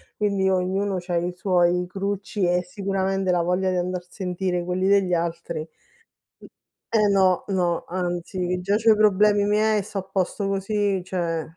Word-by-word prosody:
quindi 200 -2 0
ognuno 190 +2 0
c'ha 175 -1 -2
i 175 +1 -1
suoi 180 -1 +2
crucci 200 +1 -3
e 180 0 +2
sicuramente 195 0 -1
la 175 - +2
voglia 180 +2 0
di 185 - 0
andar 180 0 -1
a - - -26
sentire 180 -2 -2
quelli 180 +2 -1
degli 195 -2 +3
altri, 170 -1 -2
mhmm 155 - -6 1.3
eh, 210 - +4
no, 190 -2 +3
no, 180 -4 0
anzi, 175 0 -3
che 180 0 -2
già 200 +3 +1
c'ho 225 +1 +4
i 215 - +5
problemi 205 0 +4
miei 215 +1 +2
e - - -1
sto 205 +1 -7
a 190 - -2
posto 190 +1 -2
così, 195 -1 0
cioè 170 -3 -2
185 Hz, 175 wpm, -24 LUFS, 180-200 Hz, 1.3 s, i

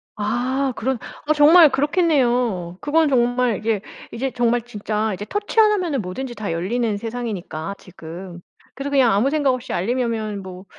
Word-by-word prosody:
아 250 +5 -1
그런 260 +2 -1 0.3
아 310 - +4
정말 310 +2 +7
그렇겠네요. 250 - +1
그건 315 +2 +2
정말 245 -3 +2
이게 215 -2 -1 0.3
이제 265 +3 -3
정말 240 0 +1
진짜 215 -2 -3
이제 205 +2 -6
터치 410 - -2
하나면은 370 - +3
뭐든지 240 +7 -6
다 205 -5 -4
열리는 210 +5 -1
세상이니까 200 -7 -5
지금. 175 0 -10 0.3
그래서 275 +1 -4
그냥 265 -4 +4
아무 215 +7 +2
생각 290 -4 +2
없이 255 0 -5
알림이 240 +8 0
오면 215 -3 -3
뭐 185 0 -10
240 Hz, 345 characters per minute, -21 LUFS, 205-270 Hz, 0.3 s, 정말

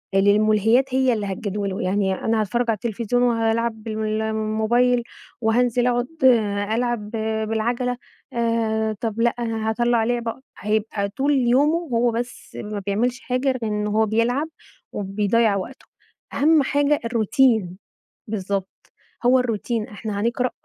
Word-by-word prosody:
للملهيات 215 +5 +3
هي 260 -1 +3
اللي 215 -3 -2
هتجدوله، 200 0 -3
يعني 190 +1 +1
أنا 220 +3 0
هاتفرج 235 +4 0
على 225 - +3
التلفزيون 235 +3 -1
وهالعب 230 -1 0
بال 215 -1 -2
الموبايل 220 +3 +1 0.4
وهانزل 240 +2 +2
أقعد 245 0 +1 0.7
ألعب 235 -3 -1 0.4
بالعَجَلة 240 +3 -1 0.4
آآ، 225 -2 0
طَب 225 -1 -2
لأ 240 - +5
أنا 225 -2 -2
هاطلَّع 235 0 +2
لعبة 235 +1 -2 0.2
هيبقى 210 -1 -1
طول 275 +8 0
يومه 265 +6 +3 0.2
هو 235 +1 +3
بس 240 +1 -6
ما 210 -1 -5
بيعملش 240 +6 0
حاجة 255 +2 -2
غير 260 -1 +2
إن 210 -1 -1
هو 215 +1 +2
بيلعب 235 +7 +1 0.5
وبيضيَّع 205 +2 +1
وقته، 200 +7 -6 0.5
أهم 305 +1 +4
حاجة 285 +2 +2
الروتين. 225 -4 +2 0.5
بالضبط. 195 -2 -3 0.6
هو 255 +1 +6
الروتين 230 -2 -2
إحنا 210 -1 -5
هنقرأ 240 +3 0
225 Hz, 130 wpm, -22 LUFS, 215-245 Hz, 0.7 s, هو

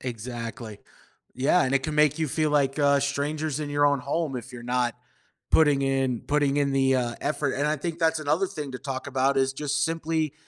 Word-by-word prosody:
Exactly. 115 -2 -6 0.6
Yeah, 140 +8 +3
and 130 +1 0
it 135 - +2
can 155 - -3
make 150 0 +3
you 160 -2 0
feel 155 +2 0
like, 140 -1 +1
uh, 140 -1 +4
strangers 145 +2 -2
in 145 -1 -4
your 145 0 +3
own 140 -2 +2
home 145 +1 -2
if 125 +1 -8
you're 120 -1 -9
not 125 -1 0 0.6
putting 145 -3 +4
in 135 -3 0
putting 145 -1 +1
in 140 -1 +1
the, 135 -1 +3
uh, 120 -2 -1
effort, 145 -1 -1
and 145 +2 0
I 155 +1 +1
think 170 +2 -4
that's 165 -1 +2
another 155 +6 +1
thing 150 -6 -6
to 125 - -5
talk 135 -2 -5
about 135 0 +1
is 135 0 +2
just 145 +1 -1
simply 160 -2 -1
140 Hz, 210 wpm, -26 LUFS, 130-150 Hz, 0.6 s, uh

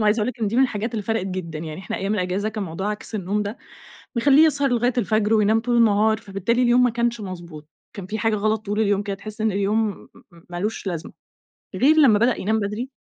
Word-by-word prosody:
وعايزة 215 +1 +2
أقول 210 - 0
لِك 255 - -6
إن 220 - +1
دي 220 - -1
من 260 - +5
الحاجات 225 -3 -1
اللي 220 - -3
فَرَقت 225 -2 -1
جدًا. 180 -4 -5
يعني 155 +1 -6
إحنا 190 - -5
أيام 195 +2 -1
الأجازة 185 +2 -1
كان 215 -2 -4
موضوع 190 +5 -3
عكس 210 +1 -7
النوم 205 +1 -1
ده 205 +4 -5 0.6
بيخلّيه 280 +6 +5
يسهر 285 -3 +1
لغاية 245 0 +1
الفجر 215 -1 +1
وينام 220 +1 +3
طول 240 +1 0
النهار، 220 -1 +4
فبالتالي 215 +3 -1
اليوم 245 +1 +4
ما 250 - +4
كانش 235 0 -1
مضبوط، 170 -6 -8 0.3
كان 200 -4 -7
في 215 +4 -4
حاجة 225 -1 +1
غلط 215 +1 -1
طول 205 +1 -2
اليوم 205 -2 +1
كده 200 -1 -3
تحس 215 +2 -9
إن 220 -1 +2
اليوم 205 +1 -1 0.2
م 170 - -18
مالوش 195 +4 -4
لازمة. 170 -3 -4 0.6
غير 300 +5 +4
لمّا 250 -9 +6
بدأ 235 +3 +2
ينام 220 +3 +1
بدري 210 +5 -3
215 Hz, 225 wpm, -22 LUFS, 195-230 Hz, 0.6 s, لمّا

